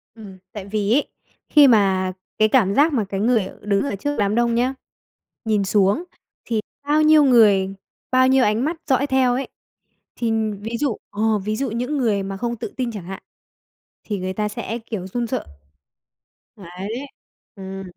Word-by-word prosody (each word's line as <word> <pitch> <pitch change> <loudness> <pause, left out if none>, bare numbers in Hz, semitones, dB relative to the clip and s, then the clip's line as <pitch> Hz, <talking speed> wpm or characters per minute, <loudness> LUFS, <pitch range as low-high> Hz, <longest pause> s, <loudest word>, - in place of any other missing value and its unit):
Ừm, 200 -4 -11
tại 205 -3 -7
vì 205 +1 -1
ấy, 285 - +2 0.4
khi 295 -2 +7
mà 190 -5 +3 0.2
cái 215 - +4
cảm 210 -5 +2
giác 295 +3 +4
mà 220 -6 +1
cái 195 -1 -3
người 220 -3 +2
đứng 200 -1 +1
ở 280 - -2
trước 290 +9 -3
đám 205 +1 +1
đông 235 0 +2
nhá, 250 +3 +1 0.7
nhìn 215 -2 +1
xuống 200 - +2 0.4
thì 225 -2 -1 0.2
bao 300 +2 +2
nhiêu 310 -1 +6
người, 205 -7 +4 0.4
bao 255 0 +4
nhiêu 265 -1 +4
ánh 215 +4 +1
mắt 320 +3 -1
dõi 270 0 +2
theo 265 -3 +2
ấy, 265 +2 -3 0.7
thì 235 -2 -1 0.3
ví 225 +3 -4
dụ 275 -7 0
ồ, 215 +1 +1
ví 215 +2 -3
dụ 270 +1 -2
những 250 +6 -2
người 215 -6 +1
mà 195 0 -5
không 235 +3 -3
tự - - -6
tin 250 -2 -2
chẳng 205 -5 -7
hạn 190 +1 -8 0.8
thì 205 -3 -3
người 185 0 -3
ta 210 +2 -2
sẽ 230 +1 -5
kiểu 195 -5 -5
run 235 +5 -3
sợ. - - -3 1.1
Đấy, 200 +8 -6 0.5
ừm. 195 -1 -7
220 Hz, 180 wpm, -21 LUFS, 200-255 Hz, 1.1 s, khi